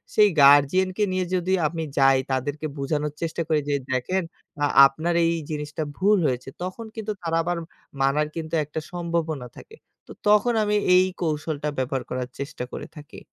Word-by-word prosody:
সেই 210 -1 +7
guardian 145 +7 +6
কে 210 - +2
নিয়ে 185 0 0
যদি 185 +1 0
আমি 165 +1 -4
যাই, 135 -1 +5
তাদেরকে 145 +4 -2
বুঝানোর 145 +1 -2
চেষ্টা 165 0 -2
করি 155 -2 +3
যে 145 - +2 0.2
"দেখেন 180 +9 0 0.4
আ - - +5 0.2
আপনার 160 +5 -2
এই 165 - +2 0.2
জিনিসটা 150 +1 -4
ভুল 205 +2 +4
হয়েছে।" 125 0 -3
তখন 185 +5 -5
কিন্তু 220 -1 -4
তারা 165 0 0
আবার 175 0 -1 0.4
মানার 145 +3 +2
কিন্তু 165 0 -4
একটা 150 +2 -5
সম্ভাবনা 170 -6 -2
থাকে। 445 - -13 0.3
তো - - -12 0.2
তখন 210 +3 +4
আমি 210 0 +1 0.2
এই 185 - +6 0.2
কৌশলটা 155 -2 -2
ব্যবহার 130 0 -1
করার 125 0 -3
চেষ্টা 140 -2 -5
করে - - -6
থাকি। 145 -1 -11
155 Hz, 170 wpm, -24 LUFS, 140-180 Hz, 0.4 s, সেই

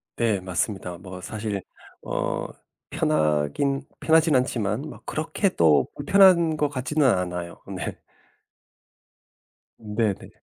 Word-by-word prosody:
네 110 -4 +1
맞습니다. 90 -1 -3
뭐 90 -1 -9
사실 105 -1 -4 0.4
어 - - -2 0.5
편하긴 75 - +1 0.2
편하진 160 -2 +4
않지만 115 -3 0
뭐 155 - -9
그렇게 165 +5 0
또 80 - +3
불편한 170 0 +5
것 150 -1 0
같지는 140 +2 +1
않아요 90 -4 -1
네. 90 - -5 1.8
네네. 105 -2 -2
110 Hz, 205 characters per minute, -25 LUFS, 90-145 Hz, 1.8 s, 불편한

